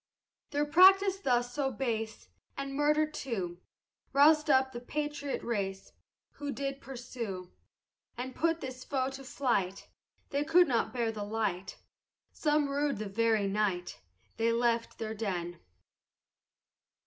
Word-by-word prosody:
Their 295 0 0
practice 385 +5 +6
thus 245 -6 +1
so 280 -1 0
base, 225 - -3 0.3
And 275 0 -4
murder 300 +2 +3
too, 220 - -4 0.5
Rouz'd 300 +2 +5
up 265 -1 +4
the 240 - -6
patriot 290 +2 -3
race, 195 -4 -3 0.5
Who 290 -1 -3
did 275 +1 -4
pursue, 235 -8 -6 0.7
And 255 +1 -4
put 330 +2 0
this 255 -1 -6
foe 265 -1 -1
to 270 0 -8
flight, 235 -8 -1 0.4
They 280 +1 +1
could 350 +3 +5
not 235 -4 +1
bear 235 -3 0
the 215 -2 -5
light, 205 -3 -2 0.5
Some 300 -1 +1
rued 280 -2 0
the 210 -1 -4
very 220 0 +2
night 195 -3 -1 0.4
They 230 +1 +2
left 235 0 +1
their 220 -1 -4
den. 175 -6 -3
255 Hz, 130 wpm, -31 LUFS, 220-285 Hz, 0.7 s, practice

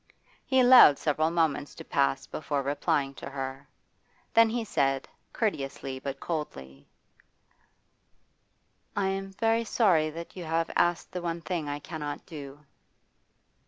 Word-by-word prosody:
He 260 -1 +3
allowed 245 - +8
several 155 +1 +1
moments 160 -4 0
to - - -10
pass 135 -1 +1
before 145 -2 -3
replying 140 0 0
to 135 - -8
her. 135 0 -6 0.7
Then 230 0 +6
he 235 +1 -1
said, 135 -8 0 0.2
courteously 135 - -3
but 135 0 -5
coldly: 70 - -6 2.1
'I 200 -1 +1
am 195 0 -3
very 225 +2 +1
sorry 185 -9 +3
that 165 +2 -9
you 180 - -6
have 165 +1 -1
asked 175 0 +1
the 180 - -4
one 170 -1 -3
thing 165 -4 -3
I 145 - -2
cannot 150 -1 -6
do. 145 -3 -10
155 Hz, 130 wpm, -28 LUFS, 140-180 Hz, 2.1 s, allowed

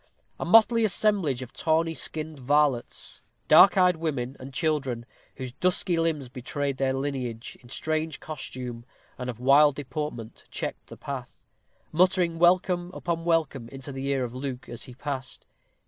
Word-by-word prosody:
A - - -2
motley 225 +1 +6
assemblage 190 - +2
of 125 - -12
tawny 165 +1 +1
skinned 155 -1 -3
varlets, 140 -1 0 0.3
dark 195 -1 +8
eyed 180 -2 +5
women 140 -6 -2
and 130 +1 -9
children, 135 -4 -1 0.3
whose 130 -1 -6
dusky 180 +5 0
limbs 165 -5 0
betrayed 135 +2 -3
their 135 -1 +1
lineage, 130 -4 -3
in 120 - -17
strange 155 +2 -2
costume, 125 -5 -7 0.4
and 125 0 -4
of 120 -2 -6
wild 140 +3 +6
deportment, 145 -5 -5
checked - - -5
the - - -11
path, - - -7 0.5
muttering 175 -1 +2
welcome 175 0 +3
upon 165 -1 -3
welcome 155 -8 0
into 135 +2 -8
the 135 0 -4
ear 135 -2 +1
of 120 -1 -4
Luke 130 -1 -5
as 120 - -7
he 125 -3 -11
passed. 135 -1 -5
145 Hz, 150 wpm, -27 LUFS, 130-165 Hz, 0.5 s, dark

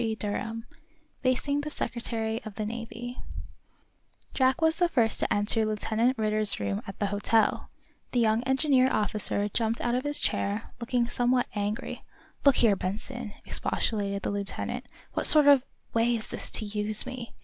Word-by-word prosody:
CHAPTER 220 -2 -2 0.2
XI - - -25 0.4
FACING 275 +3 +1
THE 300 - -4
SECRETARY 230 -4 -3
OF 215 -2 -8
THE 215 - -3
NAVY 235 +2 -6 1.2
Jack 260 +4 +2
was 320 0 +2
the 350 -1 +2
first 230 -8 +2
to - - 0
enter 205 +2 +2
Lieutenant 220 +3 0
Ridder's 215 -1 +3
room 100 -1 -2
at 195 - -7
the 205 - 0
hotel. 215 +2 +1 0.4
The 245 - +1
young 220 0 +3
engineer 265 -1 +3
officer 205 -1 0
jumped 225 +1 -1
up - - -4
out 240 - +1
of 250 +1 0
his 290 0 +1
chair, 205 +3 -1
looking 235 0 0
somewhat 245 +1 +2
angry. 205 +1 -3 0.4
"Look 280 -2 +6
here, 220 -4 +5
Benson," 215 +4 -5
expostulated 200 -2 -1
the - - -1
lieutenant, 200 -1 -3 0.3
"what - - +7
sort 305 -2 +6
of 285 -2 +7 0.3
way 230 +1 +3
is 220 -1 -5
this - - -5
to 220 - -2
use 210 +1 -1
me? 255 -2 -7
230 Hz, 165 wpm, -28 LUFS, 210-255 Hz, 1.2 s, what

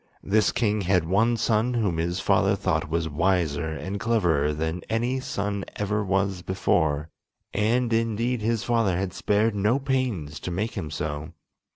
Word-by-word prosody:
This 105 +2 +3
king 105 -3 +1
had 90 -2 +2
one 110 +7 +2
son 115 +2 +1
whom 100 -8 0
his 85 +3 -1
father - - +3
thought - - -1
was 85 0 0
wiser 80 -1 +1
and 85 +7 -4
cleverer 85 -11 +2
than 80 +3 -2
any 120 +4 0
son 100 -5 -3
ever 105 +1 -1
was 95 -1 0
before, 80 -4 0 0.4
and 115 +3 +1
indeed 115 +1 0
his 115 0 0
father 115 -7 +1
had 95 -1 -2
spared 105 +2 +1
no 105 +5 +2
pains 125 - -2
to - - -5
make 100 +6 -2
him 85 -7 -4
so. 75 0 -4
100 Hz, 160 wpm, -25 LUFS, 85-115 Hz, 0.4 s, This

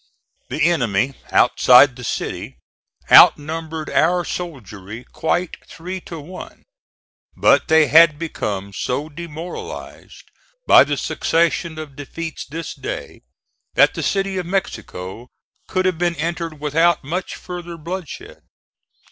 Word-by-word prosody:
The - - -1
enemy 130 - +1 0.2
outside 125 +1 +6
the 125 - -10
city - - -4 0.5
outnumbered 160 +1 +5
our 175 0 +2
soldiery 115 - -7
quite 170 +6 -2
three 185 +3 -7
to 165 - -7
one, 180 +5 -11 0.7
but - - +4
they 160 -1 +5
had 155 +2 +6
become 100 - -4
so 140 +9 -3
demoralized 165 +2 -9 0.4
by - - +7
the - - -2
succession 165 0 0
of 155 -3 -8
defeats 155 +3 -7
this 165 +4 -6
day, - - -7 0.5
that - - +5
the - - -4
City 195 -1 -1
of 180 - -5
Mexico 110 - -4 0.4
could 185 0 -1
have 185 -3 0
been 175 -1 0
entered 165 0 -4
without 160 +4 +2
much 175 +7 -4
further 175 -1 -8
bloodshed. 170 +1 -7
160 Hz, 120 wpm, -20 LUFS, 140-175 Hz, 0.7 s, by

